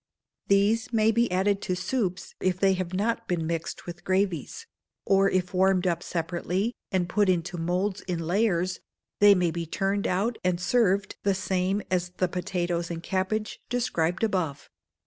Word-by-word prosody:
These 205 Hz, +4 st, +3 dB
may 220 Hz, -1 st, +3 dB
be 235 Hz, -2 st, +1 dB
added 195 Hz, +2 st, +1 dB
to 185 Hz, -, -1 dB
soups, 185 Hz, -1 st, -2 dB
if 185 Hz, -1 st, 0 dB
they 195 Hz, 0 st, +4 dB
have 185 Hz, -2 st, -3 dB
not 230 Hz, +4 st, -1 dB
been 175 Hz, -4 st, -1 dB
mixed 165 Hz, 0 st, -4 dB
with 175 Hz, 0 st, -8 dB
gravies: 190 Hz, -, -1 dB, 0.4 s
or 195 Hz, 0 st, +4 dB
if 185 Hz, 0 st, -1 dB
warmed 190 Hz, 0 st, +3 dB
up 170 Hz, -2 st, +1 dB
separately, 175 Hz, +7 st, -2 dB, 0.2 s
and 185 Hz, -2 st, +1 dB
put 205 Hz, +2 st, +2 dB
into 180 Hz, +1 st, 0 dB
moulds 180 Hz, +4 st, -1 dB
in 180 Hz, -2 st, -1 dB
layers, 185 Hz, -1 st, +1 dB, 0.4 s
they 205 Hz, 0 st, +8 dB
may 180 Hz, -2 st, +1 dB
be 170 Hz, 0 st, -4 dB
turned 195 Hz, +4 st, 0 dB
out, 205 Hz, +6 st, 0 dB
and 180 Hz, -1 st, +1 dB
served 200 Hz, 0 st, +1 dB
the 200 Hz, -1 st, +1 dB
same 190 Hz, +1 st, 0 dB
as 180 Hz, -1 st, +1 dB
the 185 Hz, -, +2 dB
potatoes 175 Hz, -1 st, -2 dB
and 170 Hz, -1 st, -5 dB
cabbage 195 Hz, +4 st, -2 dB
described 195 Hz, -7 st, 0 dB
above. 180 Hz, -10 st, -1 dB
185 Hz, 165 wpm, -27 LUFS, 175-200 Hz, 0.4 s, they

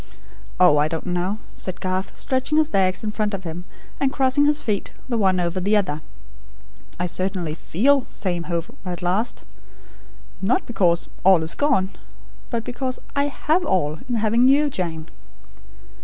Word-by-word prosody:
"Oh, 150 Hz, -, +6 dB
I 150 Hz, +1 st, +3 dB
don't 160 Hz, 0 st, -4 dB
know," 180 Hz, +3 st, -1 dB, 0.2 s
said 185 Hz, -1 st, -5 dB
Garth, 185 Hz, +1 st, -3 dB
stretching 260 Hz, +3 st, 0 dB
his 310 Hz, 0 st, +2 dB
legs 185 Hz, 0 st, +2 dB
in 215 Hz, -, -2 dB
front 210 Hz, -1 st, -1 dB
of 190 Hz, -, -7 dB
him, 175 Hz, +1 st, -6 dB, 0.3 s
and 275 Hz, -1 st, +2 dB
crossing 270 Hz, +1 st, +3 dB
his 295 Hz, 0 st, +3 dB
feet 210 Hz, -3 st, -2 dB, 0.2 s
the 245 Hz, -, -1 dB
one 190 Hz, -4 st, +3 dB
over 175 Hz, +1 st, -1 dB
the 205 Hz, +4 st, +3 dB
other. 155 Hz, -7 st, -1 dB, 1.0 s
"I 180 Hz, -, 0 dB
certainly 180 Hz, -2 st, -2 dB
feel 255 Hz, -, +2 dB
'Safe 175 Hz, -3 st, -3 dB
home 170 Hz, -2 st, -4 dB
at 180 Hz, -2 st, -5 dB
last' 195 Hz, +7 st, 0 dB, 1.0 s
not 200 Hz, +6 st, +1 dB
because 175 Hz, -7 st, +2 dB, 0.2 s
'all 185 Hz, -3 st, +6 dB
is 160 Hz, -, -1 dB
gone'; 260 Hz, -10 st, +1 dB, 0.6 s
but 230 Hz, -2 st, -2 dB
because 255 Hz, +1 st, -3 dB, 0.2 s
I 280 Hz, 0 st, +2 dB
HAVE 310 Hz, +5 st, 0 dB
all, 155 Hz, -, 0 dB
in 245 Hz, -, 0 dB
having 230 Hz, +3 st, +3 dB
you, 285 Hz, +2 st, +4 dB
Jane." 165 Hz, -6 st, -3 dB
195 Hz, 160 wpm, -23 LUFS, 175-250 Hz, 1.0 s, Oh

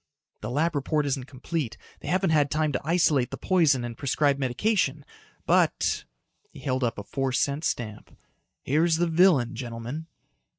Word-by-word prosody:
"The 110 Hz, -, -4 dB
lab 155 Hz, +7 st, +1 dB
report 150 Hz, +1 st, 0 dB
isn't 135 Hz, -2 st, -2 dB
complete. 130 Hz, -3 st, -4 dB, 0.2 s
They -, -, -10 dB
haven't 185 Hz, -1 st, +1 dB
had 145 Hz, -2 st, +3 dB
time 155 Hz, 0 st, 0 dB
to 130 Hz, -, -2 dB
isolate 150 Hz, -5 st, +2 dB
the -, -, -6 dB
poison 155 Hz, -9 st, +2 dB
and 120 Hz, -1 st, -6 dB
prescribe 140 Hz, +2 st, +1 dB
medication. 140 Hz, -, 0 dB, 0.4 s
But" -, -, +2 dB, 0.4 s
he -, -, -13 dB
held 130 Hz, -1 st, -1 dB
up 115 Hz, -, -1 dB
a 105 Hz, -, -5 dB
four 135 Hz, +3 st, -2 dB
cent 140 Hz, +3 st, 0 dB
stamp 110 Hz, -8 st, -4 dB, 0.5 s
"here's 160 Hz, +4 st, +2 dB
the 175 Hz, +2 st, +1 dB
villain, 160 Hz, -7 st, +4 dB
gentlemen." 120 Hz, +6 st, -6 dB
140 Hz, 160 wpm, -26 LUFS, 125-160 Hz, 0.5 s, villain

